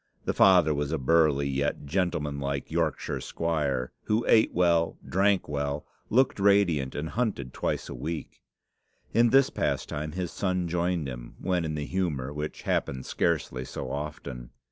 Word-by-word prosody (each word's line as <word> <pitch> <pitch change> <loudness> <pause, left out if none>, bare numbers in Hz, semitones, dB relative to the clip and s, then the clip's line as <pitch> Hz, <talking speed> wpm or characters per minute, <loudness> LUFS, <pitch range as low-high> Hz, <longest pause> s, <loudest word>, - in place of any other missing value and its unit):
The - - 0
father 90 -5 +6
was 75 0 -2
a 80 - 0
burly, 70 0 +3
yet 70 +1 -1
gentlemanlike 70 -5 -2
Yorkshire - - -1
squire, 70 -6 -1
who 110 +2 +1
ate 110 - +5
well, 85 -2 +2
drank 100 +1 +2
well, 70 0 -2 0.2
looked 130 -2 +3
radiant, 95 -9 +3
and 80 +2 -3
hunted 105 - -2
twice - - -2
a - - -6
week. 80 +5 -5 0.7
In 120 0 +5
this 135 +2 +5
pastime 75 +1 -2
his 90 -1 -3
son 90 -3 -1
joined 85 -2 0
him - - -8
when 90 -2 0
in 80 -1 -2
the 75 -1 -3
humour, 75 -8 -2
which 75 +1 -5
happened 65 -1 -1
scarcely 75 -6 -1
so - - -6
often. 70 -4 -6
80 Hz, 150 wpm, -28 LUFS, 70-90 Hz, 0.7 s, father